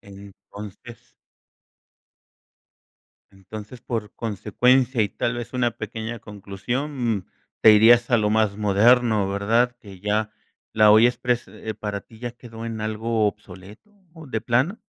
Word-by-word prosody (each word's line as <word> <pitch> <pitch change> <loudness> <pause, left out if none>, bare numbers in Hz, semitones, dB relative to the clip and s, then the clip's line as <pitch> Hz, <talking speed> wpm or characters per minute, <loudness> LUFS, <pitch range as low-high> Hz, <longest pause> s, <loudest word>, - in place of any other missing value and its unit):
Entonces. 100 +2 -13 2.2
Entonces, 105 +4 -11
por 110 -4 -4
consecuencia, 120 +3 +1
y 105 - 0
tal 120 - -2
vez 120 -1 -6
una 125 -2 0
pequeña 110 +2 -6
conclusión, 115 +6 -3
mm, 90 - -14 0.3
te 110 - +8
irías 115 +3 +6
a 120 - +5
lo 105 -2 +1
más 110 -2 +1
moderno, 110 +1 +3
¿verdad?, 115 +5 +1
que 95 -3 -13
ya, 105 +2 -1 0.4
la 110 -1 +5
olla 110 +3 +7
exprés, 125 -1 -1
eh, 110 0 -7
para 105 -1 -5
ti 110 +2 -19
ya 120 0 -5
quedó 115 -2 -11
en 115 -1 -5
algo 110 +1 -1
obsoleto, 105 - -8 0.2
¿o 160 -2 -12
de 115 -5 -3
plano? 125 - 0
110 Hz, 135 wpm, -23 LUFS, 105-120 Hz, 2.2 s, te